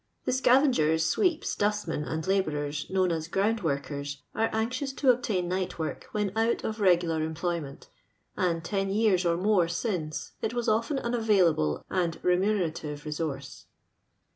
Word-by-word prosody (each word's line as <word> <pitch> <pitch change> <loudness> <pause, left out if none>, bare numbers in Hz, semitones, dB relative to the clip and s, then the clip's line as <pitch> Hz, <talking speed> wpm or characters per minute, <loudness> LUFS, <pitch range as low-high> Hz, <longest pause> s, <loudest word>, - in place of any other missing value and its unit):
The - - +1
scavengers, 245 - +3
sweeps, 360 - +1
dustmen, 205 -7 -1
and 160 +1 -3
iabouxcis 150 -6 -1
known 185 -2 +2
as 160 -1 -2
ground 205 +5 +1
workers, 140 -2 -3
ore 225 +1 +1
anxious 255 +5 -2
to 270 -1 +4
obtain 215 -7 -1
night 185 +1 -2
work 160 -1 -4
when 210 -2 -2
out 225 +1 +1
of 220 0 -3
regular 175 -5 +3
em 160 0 -3
ployment; 165 -4 -4 0.5
and, 170 -3 0
ten 195 -2 -1
years 195 -3 +2
and 170 +2 0
more 200 -5 +3
since, 170 -4 -3
it 220 +2 -2
was 240 -1 -1
ofU^n 230 +6 +1
an 235 - -1
available 185 - +2
and 170 -3 -1
remuneradvc 180 -6 0
re 150 - -4
source. 140 -3 -5
180 Hz, 155 wpm, -28 LUFS, 160-220 Hz, 0.5 s, to